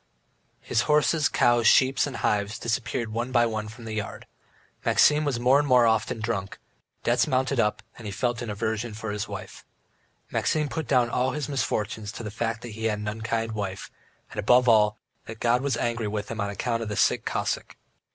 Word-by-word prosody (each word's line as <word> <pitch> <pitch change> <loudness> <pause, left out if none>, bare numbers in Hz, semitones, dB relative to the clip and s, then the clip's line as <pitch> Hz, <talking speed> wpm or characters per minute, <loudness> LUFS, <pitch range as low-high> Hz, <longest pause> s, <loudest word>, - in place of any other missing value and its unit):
His 110 - +1
horses, 150 +1 +3
cows, 120 -1 +3
sheep, 135 0 +5
and 135 - -6
hives 105 -1 0
disappeared 115 0 -2
one 120 +3 -2
by 120 -2 +4
one 110 -2 -3
from 115 +2 -11
the 110 - -5
yard; 110 -1 -5 0.6
Maxim 150 +1 +4
was 135 -5 -1
more 130 +3 +5
and 145 - 0
more 125 -3 +5
often 110 0 +1
drunk, 110 -3 -3 0.5
debts - - +2
mounted 130 0 +1
up, 105 -2 +1 0.2
he 105 - -6
felt 120 +4 -1
an 120 - -5
aversion 110 +1 -3
for 110 0 -5
his 105 0 -3
wife. - - -8 0.7
Maxim 150 -2 0
put 160 +1 -4
down 125 -3 +2
all 130 +1 +1
his 150 -2 -3
misfortunes 110 -6 -2
to - - -7
the 105 - -5
fact 115 +1 -3
that 120 - -6
he 110 +1 -6
had 105 -2 +1
an 105 0 -5
unkind 110 +1 -2
wife, 100 -3 -5 0.4
and - - -6
above 125 +4 +4
all, 105 -2 +4 0.3
that 110 0 -8
God 120 +1 +2
was 140 -1 0
angry 115 -2 -1
with 105 0 -4
him 115 -1 -3
on 100 - -1
account 115 +3 -2
of 110 - -4
the 105 - -3
sick - - +2
Cossack. - - -3
115 Hz, 200 wpm, -26 LUFS, 105-125 Hz, 0.7 s, sheep